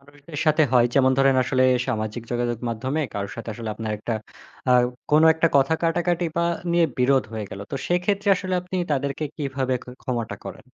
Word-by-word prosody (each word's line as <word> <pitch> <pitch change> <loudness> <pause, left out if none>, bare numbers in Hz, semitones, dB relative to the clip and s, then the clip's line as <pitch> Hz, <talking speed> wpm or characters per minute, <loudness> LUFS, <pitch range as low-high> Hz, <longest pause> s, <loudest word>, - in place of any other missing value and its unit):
মানুষদের 145 +2 -11
সাথে 155 0 +4
হয় 120 -1 +5
যেমন 130 -1 +4
ধরেন 135 -1 +4
আসলে 130 0 +2 0.2
সামাজিক 110 -2 -3
যোগাযোগ 120 -1 -1
মাধ্যমে 130 +7 -2
কারো 100 -1 -3
সাথে 115 - -7
আসলে 115 0 -6
আপনার 110 -1 -4
একটা 115 +2 -3 0.6
আ - - +7 0.4
কোনো 155 +2 +6
একটা 160 +1 +2
কথা 140 +3 +3
কাটাকাটি 175 +1 +1
বা 170 - +2 0.3
নিয়ে 170 -1 +4
বিরোধ 130 +1 +3
হয়ে 110 -3 -5
গেল। 95 - -7
তো - - -3
সেক্ষেত্রে 195 +3 0
আসলে 185 -1 -3
আপনি 180 +1 -6 0.2
তাদেরকে 140 +2 -1
কিভাবে 135 -3 -1
খ - - -13 0.2
ক্ষমাটা 120 -3 -3
করেন? - - -9
135 Hz, 185 wpm, -24 LUFS, 120-160 Hz, 0.6 s, আ